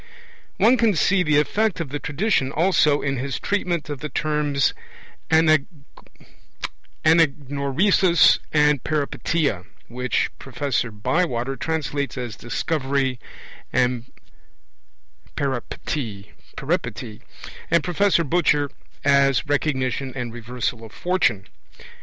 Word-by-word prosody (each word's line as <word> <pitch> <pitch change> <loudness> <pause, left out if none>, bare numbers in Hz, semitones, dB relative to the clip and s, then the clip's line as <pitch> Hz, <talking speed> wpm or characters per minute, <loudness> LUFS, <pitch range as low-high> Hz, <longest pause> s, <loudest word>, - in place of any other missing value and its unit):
One 250 +3 +5
can 225 -4 +3
see 185 +5 +3
the 150 -4 +2
effect 205 +7 +1
of 165 -5 -3
the 145 +2 -4
tradition 150 -2 0
also 155 -3 +3
in 135 -1 -1
his 135 +1 -3
treatment 180 -5 -1
of 145 -2 -5
the 150 - -5
terms 145 -1 0 0.6
Anagnorisis 160 -1 +5 2.9
and 150 -3 +3
Peripeteia, 145 - -1 0.2
which 125 +2 -1
Professor 130 -2 -2
Bywater 125 +3 -1
translates 145 -3 -2
as 120 -5 -4
'Discovery 135 +1 -1 0.5
and 125 -1 0 1.2
Peripety' 120 -5 -4 1.4
and 170 -2 +3
Professor 180 0 +2
Butcher 150 -3 +1 0.3
as 140 -1 +4
'Recognition 135 -3 -1
and 120 -3 -4
Reversal 120 0 -4
of 110 - -10
Fortune'. 175 - 0
145 Hz, 95 wpm, -23 LUFS, 125-160 Hz, 2.9 s, One